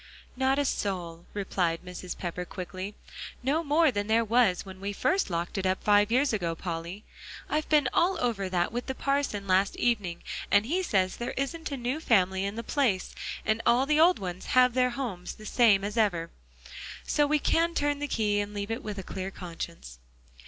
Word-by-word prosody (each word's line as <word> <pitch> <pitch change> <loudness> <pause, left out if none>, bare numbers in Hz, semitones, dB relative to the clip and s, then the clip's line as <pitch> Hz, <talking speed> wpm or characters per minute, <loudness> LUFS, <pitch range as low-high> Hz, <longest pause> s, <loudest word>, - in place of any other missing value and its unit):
"Not 265 +1 +2
a 285 - +1
soul," 175 -8 -3
replied 180 -4 -1
Mrs. 180 0 -7
Pepper, 180 0 -4
quickly; 185 +2 -6 0.5
"no 295 +6 +1
more 310 0 +4
than 205 -2 -2
there 225 +1 +3
was 220 -5 +3
when 190 -1 -10
we 200 +1 -3
first 375 - +1
locked 170 +2 -2
it 190 - -3
up 185 0 -1
five 205 +1 +4
years 260 +1 +3
ago, 170 -5 -1
Polly. 170 +4 -5 0.4
I've 305 +1 -1
been 295 -4 +4
all 360 +2 +3
over 215 -8 -1
that 175 -1 0
with 245 +2 -4
the 265 - -3
parson 275 -9 -1
last 190 +1 +2
evening; 205 -8 0 0.3
and 205 +1 +4
he 345 +9 0
says 190 - +1
there 240 - -4
isn't 300 +4 -3
a 280 - -2
new 250 +4 -2
family 190 - +2
in 200 +1 -3
the 230 - -4
place, 225 -8 0 0.3
and 215 +1 +1
all 245 +3 +4
the 300 +2 +2
old 350 +3 +6
ones 180 -1 -6
have 250 -1 +6
their 250 0 +3
homes, 235 -9 -5
the 215 - -12
same 215 -4 +4
as 205 +3 -4
ever. 175 -7 +1 0.7
So 295 -1 +2
we 305 +1 +3
can 335 +3 +1
turn 290 0 +1
the 290 - -2
key 210 -5 +1
and 205 0 -4
leave 205 +1 -3
it 225 - -2
with 210 -1 -6
a 195 - -5
clear 190 +1 -5
conscience." 170 - -8
210 Hz, 200 wpm, -28 LUFS, 185-265 Hz, 0.7 s, old